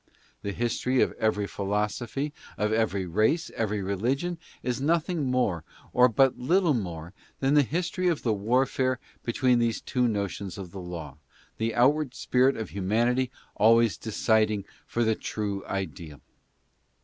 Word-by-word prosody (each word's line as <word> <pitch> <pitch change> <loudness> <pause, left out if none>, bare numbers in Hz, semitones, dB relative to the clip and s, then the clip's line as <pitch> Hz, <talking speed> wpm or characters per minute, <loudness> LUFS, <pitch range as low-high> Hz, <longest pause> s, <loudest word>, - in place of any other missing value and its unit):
The 100 0 -3
history 120 +4 0
of - - -1
every 105 -2 +1
philosophy, 105 +8 -2 0.2
of 105 +1 0
every 105 -4 +1
race, 110 - +1
of - - -17
every 105 -2 -1
religion, 130 - -1 0.2
is 125 +1 -2
nothing 160 -1 +1
more, 105 -10 +1 0.3
or 125 0 +6
but 135 +3 +3
little 170 +5 +3
more, 85 -6 -4 0.3
than 135 +1 +2
the 150 - +7
history 175 +6 -1
of 170 -4 0
the 115 - +2
warfare 130 +4 +1 0.2
between 125 0 +2
these 115 -1 +1
two 125 -1 0
notions 100 -3 -3
of 95 -3 -7
the 95 - -7
Law, 80 -5 -7 0.4
the 110 0 -1
onward 135 +2 +3
spirit 130 +2 +2
of 110 - -5
humanity 120 +6 +1 0.3
always 115 -2 +5
deciding 110 0 +1 0.2
for 120 - 0
the 110 0 +3
true 100 -2 -3
ideal. 85 -5 -5
115 Hz, 150 wpm, -27 LUFS, 100-130 Hz, 0.4 s, the